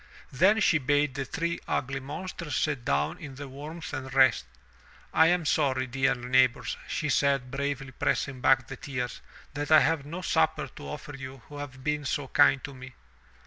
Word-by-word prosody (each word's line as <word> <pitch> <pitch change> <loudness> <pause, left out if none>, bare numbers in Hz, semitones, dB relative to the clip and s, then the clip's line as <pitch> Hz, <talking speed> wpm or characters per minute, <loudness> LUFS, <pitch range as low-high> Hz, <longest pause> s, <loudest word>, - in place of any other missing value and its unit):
Then 190 - +4
she 160 -4 +4
bade 145 +1 +1
the 135 -1 -3
three 170 +5 -2
ugly 135 +1 -1
monsters 150 +2 -6
sit 145 -5 0
down 70 -1 0
in 140 -4 -9
the 140 +1 -7
warmth 150 +5 -8
and 130 -2 -5
rest. 130 - +4 0.7
"I 160 - +6
am 175 -1 +2
sorry, 135 -4 +1
dear 135 +1 +1
neighbors," 125 0 +2
she 155 - -2
said, 140 -3 +1
bravely 135 -1 -3
pressing 130 +1 -1
back 130 -2 +4
the 135 - -8
tears, 125 -3 -4 0.3
that 145 +1 -4
I 155 - +8
have 150 +2 +1
no 170 +6 -7
supper 80 - +1
to 70 - -10
offer 145 - -7
you 130 -2 -9
who 145 - -9
have 130 -2 -8
been 150 0 -1
so 135 0 -2
kind 135 - +4
to 140 - -7
me." 130 0 -11
135 Hz, 185 wpm, -28 LUFS, 130-150 Hz, 0.7 s, I